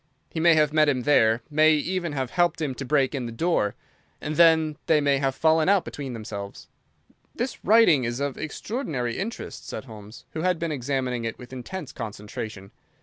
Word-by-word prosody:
He 160 - -4
may 170 0 +5
have 150 -1 +3
met 155 -1 +4
him 130 -3 0
there, 115 -5 +3
may 155 +1 +5
even 170 +1 -1
have 130 -3 -3
helped 175 -2 +1
him 150 -4 -2
to 135 - -6
break 135 0 +1
in 130 -4 -3
the - - -6
door, 115 - 0 0.4
and 150 +1 -4
then 160 -2 +4
they 155 -2 +4
may 140 -1 +2
have 135 -1 0
fallen 160 +3 +3
out 200 -2 +3
between 135 -3 -6
themselves." 100 -3 -7 0.7
"This 245 +3 -4
writing 210 - +5
is 120 +1 -2
of 140 -1 -2
extraordinary 155 - -4
interest," 220 +5 -6
said - - -6
Holmes, 110 -1 -12
who 160 - -4
had 180 0 +1
been 165 0 -3
examining 130 -3 -2
it 115 -1 -4
with 125 +1 -12
intense 140 +6 -6
concentration. 105 -2 -7
145 Hz, 190 wpm, -25 LUFS, 120-160 Hz, 0.7 s, may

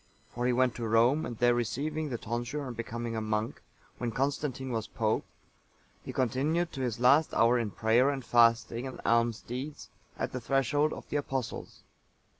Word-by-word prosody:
For 120 +1 -1
he - - +3
went 125 0 +2
to 115 -1 -3
Rome, 120 +7 +3
and 120 - -6
there 120 +1 +4
receiving 150 +6 -2
the 120 - -2
tonsure 120 +6 -3
and 125 -2 -6
becoming 115 0 -4
a 110 - -1
monk, 110 +1 -2 0.4
when 120 -2 -2
Constantine(885) 135 0 -2
was 110 -2 -2
pope, 110 -1 -1 0.8
he - - -6
continued 145 +8 0
to 135 - -5
his 120 -3 -2
last 140 +6 +4
hour 120 +2 +4
in 115 -3 -1
prayer 115 +6 +3
and 135 -3 -3
fasting 115 +1 +3
and 130 - -8
alms 115 -1 +2
deeds 130 +5 -6 0.3
at - - -2
the 130 - -4
threshold 140 +4 +1
of - - -8
the 145 - 0
Apostles. 135 -4 -4
120 Hz, 180 wpm, -30 LUFS, 115-135 Hz, 0.8 s, there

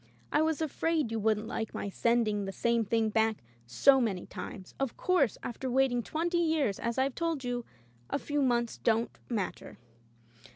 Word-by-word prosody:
I 300 - +3
was 320 0 +1
afraid 315 -3 0
you 225 - -1
wouldn't 215 0 +1
like 220 0 -4
my - - -3
sending 215 -1 +1
the 195 - -3
same 235 +3 +1
thing 220 +1 +1
back 220 0 +2 0.3
so 265 - +5
many 195 -7 -1
times. 190 -3 -8
Of 270 -3 -2
course, 335 - +2
after 255 +2 -4
waiting 255 -1 +2
twenty 340 +7 -1
years, 315 - +1
as 235 +1 -2
I've 265 0 +1
told 330 -3 -2
you 245 -1 -2 0.2
— 120 0 -32
a - - 0
few 290 0 -1
months 240 -3 +1
don't 230 +1 +1
matter. 215 -6 -3
235 Hz, 175 wpm, -30 LUFS, 220-280 Hz, 0.3 s, so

